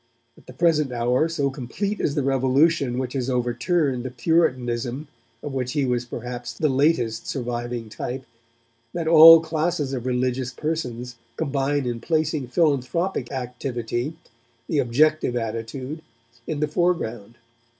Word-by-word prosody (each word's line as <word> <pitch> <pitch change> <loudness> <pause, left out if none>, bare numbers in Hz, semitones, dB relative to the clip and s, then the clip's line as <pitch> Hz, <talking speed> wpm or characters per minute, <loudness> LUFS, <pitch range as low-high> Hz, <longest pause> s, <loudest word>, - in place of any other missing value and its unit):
At - - -21
the 130 - -10
present 150 -1 +2
hour, 125 +6 +1
so 145 -4 -1
complete 150 - -3
is 140 - 0
the 145 - 0
revolution 135 +1 +2
which 125 -1 -3
has 130 -2 -2
overturned 125 +3 0
the 130 - -4
puritanism 125 -2 0 0.4
of 145 - -5
which 125 -2 -2
he 145 -3 +1
was 125 -1 0
perhaps 120 0 -6
the 150 +6 0
latest 130 -5 +1
surviving 120 -2 -3
type, 130 +4 -5 0.7
that 170 -2 -2
all 165 0 +10
classes 160 -3 -1
of 130 -1 -3
religious 125 0 -1
persons 125 -5 -4 0.2
combine 140 -2 0
in 120 -1 -2
placing 155 0 -1
philanthropic 150 +1 0
activity, 125 +1 -3 0.5
the 155 - 0
objective 145 +2 +2
attitude, 120 +6 -4 0.5
in 155 -2 -3
the 150 - +2
foreground. 145 - -1
130 Hz, 135 wpm, -23 LUFS, 120-155 Hz, 0.7 s, all